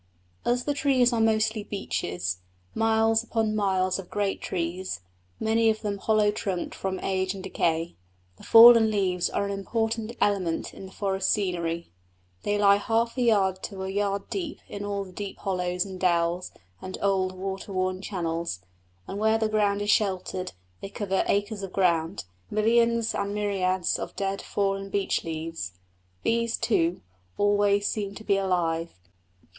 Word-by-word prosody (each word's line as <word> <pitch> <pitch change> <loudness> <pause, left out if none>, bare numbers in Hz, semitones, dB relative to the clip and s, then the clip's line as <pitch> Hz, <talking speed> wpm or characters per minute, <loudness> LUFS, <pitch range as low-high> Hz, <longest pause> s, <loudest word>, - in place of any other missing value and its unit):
As 245 +1 +1
the 290 - 0
trees 265 -4 +3
are 230 - +1
mostly 220 -1 +2
beeches 90 - -3 0.3
miles 225 0 +3
upon 225 -2 0
miles 190 -2 +1
of 185 - -9
great 205 -1 -1
trees, 175 - -3 0.4
many 225 +1 +3
of 215 0 0
them 205 -2 -3
hollow 215 0 +3
trunked 195 -3 -3
from 190 -1 -3
age 190 0 -1
and 190 - -8
decay 165 -3 0 0.4
the - - -15
fallen 230 -1 +9
leaves 185 -4 +1
are - - -1
an 200 - -3
important 225 +3 -2
element 185 -5 0
in 190 - -9
the - - -14
forest 195 -1 -1
scenery. 170 - -1 0.5
They 205 0 0
lie 200 -1 +6
half 230 +3 0
a 255 - -1
yard 195 -5 +3
to 195 -3 -6
a 190 - -3
yard 200 0 -1
deep 345 -6 -4
in 205 - -6
all 200 -1 -2
the 190 - -12
deep 200 +1 -6
hollows 180 -1 -1
and 190 -2 -8
dells 175 0 +1 0.3
and 185 0 -6
old 190 -2 +1
water 195 +1 -5
worn 185 0 -1
channels, 170 - -3 0.4
and 200 - -5
where 220 +1 +3
the 220 -1 +1
ground 205 -1 +1
is 205 - +2
sheltered 185 -2 0 0.3
they 195 - -6
cover 195 -2 -1
acres 205 +1 0
of 195 -2 -6
ground 165 - +1 0.2
millions 230 +1 +2
and 200 +1 -2
myriads 190 -3 0
of - - -6
dead, 195 0 -2
fallen 195 -1 -1
beech 195 0 0
leaves. 160 - -5 0.5
These, 230 0 +1
too, 170 -6 +1 0.4
always 205 0 +3
seem 200 -2 -3
to 220 - -9
be 200 -2 +2
alive. 170 -3 0
200 Hz, 160 wpm, -26 LUFS, 185-215 Hz, 0.5 s, fallen